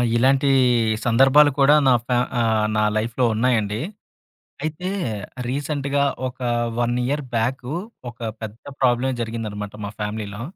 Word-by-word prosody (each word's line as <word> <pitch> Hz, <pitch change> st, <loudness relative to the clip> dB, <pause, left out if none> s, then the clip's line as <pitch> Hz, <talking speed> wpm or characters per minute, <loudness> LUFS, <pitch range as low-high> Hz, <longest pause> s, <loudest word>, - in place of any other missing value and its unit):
ఇలాంటి 135 Hz, +3 st, +3 dB, 0.6 s
సందర్భాలు 135 Hz, +5 st, +5 dB
కూడా 140 Hz, +2 st, +6 dB
నా 130 Hz, -, +6 dB
ఫ్యా 125 Hz, -1 st, +2 dB, 0.2 s
ఆహ్, 110 Hz, -2 st, +2 dB
నా 105 Hz, -, +3 dB
లైఫ్‌లో 115 Hz, +3 st, 0 dB
ఉన్నాయండి. 110 Hz, -3 st, +1 dB, 0.8 s
అయితే 155 Hz, +4 st, -3 dB, 0.6 s
రీసెంట్‌గా 140 Hz, 0 st, -1 dB, 0.2 s
ఒక 125 Hz, -, -9 dB, 0.4 s
1 120 Hz, 0 st, +1 dB
ఇయర్ 145 Hz, +3 st, -1 dB
బ్యాకు 125 Hz, +3 st, -1 dB, 0.4 s
ఒక 120 Hz, -, -27 dB, 0.2 s
పెద్ద 110 Hz, +1 st, -8 dB, 0.2 s
ప్రాబ్లమే 130 Hz, +1 st, +2 dB
జరిగిందనమాట 105 Hz, -3 st, -5 dB
మా 100 Hz, -, -5 dB
ఫ్యామిలీలో. 105 Hz, 0 st, -4 dB
120 Hz, 120 wpm, -22 LUFS, 110-135 Hz, 0.8 s, కూడా